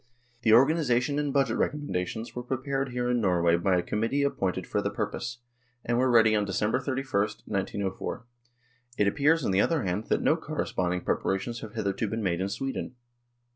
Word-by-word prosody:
The 115 - +3
organisation 135 0 +3
and 145 -1 -1
budget 135 -5 +1
recommendations 115 -6 -2
were 125 - -3
prepared 135 +2 -2
here 125 0 -2
in 125 -1 +1
Nor 90 -4 +2
way 85 0 +5
by 90 +2 +2
a 90 - 0
committee 115 +9 0
appointed 95 -10 -1
for - - -1
the - - -1
purpose, 120 0 -4 0.5
and 120 0 +1
were 130 0 +3
ready 110 -2 +5
on 105 - +2
December 105 +4 0
31, 135 0 -3 0.4
1904". 100 +2 -3 0.7
It 105 - +3
appears, 150 +6 +3
on - - +1
the 95 +1 +4
other 165 -5 +1
hand, 95 +3 -2
that - - +1
no - - +4
corresponding 90 0 -2
preparations 95 +8 -1
have 110 0 -9
hitherto 105 0 -1
been 110 +2 -3
made 90 -2 0
in 95 - -1
Sweden. 135 +2 -4
115 Hz, 180 wpm, -28 LUFS, 95-135 Hz, 0.7 s, way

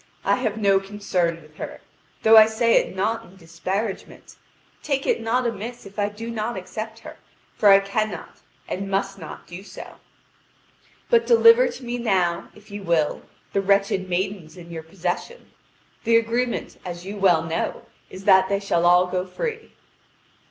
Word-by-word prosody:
I - - +3
have 220 -4 -2
no 200 -2 +3
concern 185 -4 -2
with 155 +1 -20
her, - - -7 0.4
though 225 0 +7
I 220 0 +9
say 230 +1 +2
it - - 0
not 220 +4 -1
in 185 - -17
disparagement. 190 +4 -5 0.5
Take 275 -2 -1
it - - +1
not 240 +3 0
amiss 235 +1 -5
if 200 +2 -10
I 205 0 +1
do 225 +3 -7
not 225 0 -3
accept 215 +4 -6
her, - - -11 0.4
for 210 - +4
I 195 0 +8
cannot 200 -2 -3 0.3
and 195 +1 -4
must 195 0 -1
not 160 - -9
do 175 +2 -9
so. 200 - -11 1.1
But 470 -1 +4
deliver 470 +1 +7
to 475 - -8
me 240 +1 -3
now, 185 -7 0
if 210 0 -17
you 205 0 -6
will, 170 -5 0 0.3
the 195 - +2
wretched 195 -1 +1
maidens 185 -2 -3
in 170 -1 -11
your 165 -1 -5
possession. 180 - -5 0.5
The 230 0 +5
agreement, 235 +2 -1
as 175 -1 -7
you 200 +2 -6
well 185 -5 +4
know, 165 0 -3 0.3
is 190 - -10
that 190 -2 +5
they 200 0 +1
shall 175 -4 +1
all 180 +1 +6
go 180 0 -2
free." 450 - -5
200 Hz, 170 wpm, -23 LUFS, 180-225 Hz, 1.1 s, I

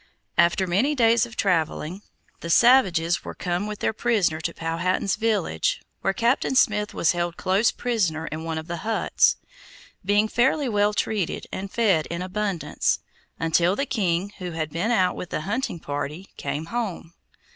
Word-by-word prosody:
After 170 +2 +3
many 210 +12 +1
days 235 -2 +4
of 235 - -13
traveling, 175 -1 0 0.4
the 170 - -6
savages 180 -7 +4
were - - -7
come 180 +3 -2
with 210 -1 -6
their - - +1
prisoner 210 -8 +1
to 170 - -2
Powhatan's 170 +4 -1
village, 210 - 0 0.2
where 195 - +1
Captain 235 +6 +1
Smith 210 -4 +3
was 165 - +3
held 175 -1 -2
close 195 +5 +2
prisoner 185 -10 -1
in 155 0 -5
one 165 -1 -3
of 160 - -5
the 170 0 -4
huts, 220 +3 +2 0.7
being 205 +3 +3
fairly 265 +5 +2
well 210 -2 +1
treated 205 -6 -1
and 195 +1 -5
fed 195 -10 +2
in 170 +1 -4
abundance, 195 -2 -1 0.4
until 170 +3 +2
the 275 - -1
king, 195 -5 -1
who 180 -2 -5
had 155 -2 -3
been 170 +8 -1
out 185 -6 +2
with 180 - -7
a - - -1
hunting 205 +1 -2
party, 145 +5 -5
came 150 +2 -4
home. 200 -8 -3
190 Hz, 165 wpm, -24 LUFS, 170-220 Hz, 0.7 s, days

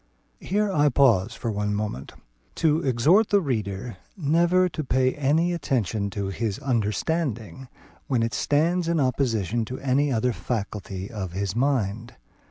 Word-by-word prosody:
Here 205 +2 0
I 150 -4 +3
pause 115 -5 +3
for 115 - -3
one 105 0 -1
moment, 105 -11 -4 0.4
to 155 -1 +2
exhort 145 - +3
the 205 - +4
reader 110 - -3 0.2
never 175 +3 +3
to 160 -3 -4
pay 130 -1 +1
any 155 +5 +1
attention 115 - -1
to 100 -1 -3
his 100 0 -2
understanding 125 +1 -2 0.4
when 125 -4 +1
it 115 - -1
stands 165 +4 +1
in 170 -1 +1
opposition 120 - 0
to 130 +3 -6
any 140 +2 +1
other 120 +1 +1
faculty 100 -4 -4
of 95 -6 -5
his 100 +1 -2
mind. 120 -4 -1
125 Hz, 145 wpm, -25 LUFS, 105-150 Hz, 0.4 s, the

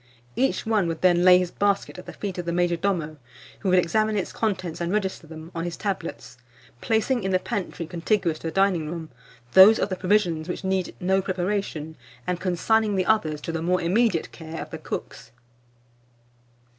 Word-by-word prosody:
Each 265 -1 0
one 215 -5 +2
would 165 -1 -4
then 175 -1 +4
lay 180 0 +8
his 180 -1 -1
basket 200 -2 0
at 180 - -12
the - - -7
feet 195 -3 -5
of 175 - -4
the - - 0
major 175 0 +1
domo, 165 -4 -2 0.4
who 195 - -1
would 185 - +4
examine 215 +5 +2
its 195 - -3
contents 185 -7 -2
and 170 +1 -1
register 190 -5 -2
them 160 +1 -10
on 165 - -3
his 175 -1 -4
tablets, 195 -10 -5 0.4
placing 230 +3 +1
in 190 - -2
the 185 - +3
pantry 185 -3 -4
contiguous 170 0 -1
to - - -5
the - - -2
dining 185 -5 +1
room, 165 -1 -6 0.4
those 200 - +9
of - - -1
the 185 - -2
provisions 180 -4 +1
which 180 - -4
need 190 -1 -1
no 190 +2 +2
preparation, 185 -4 -3 0.3
and 180 -1 -2
consigning 205 +4 +1
the 185 -1 +1
others 160 -9 +1
to 165 - -4
the 165 -1 -3
more 180 +2 +1
immediate 185 +1 +1
care 160 -1 -8
of - - -7
the - - -6
cooks. - - -6
180 Hz, 195 wpm, -25 LUFS, 170-200 Hz, 0.4 s, those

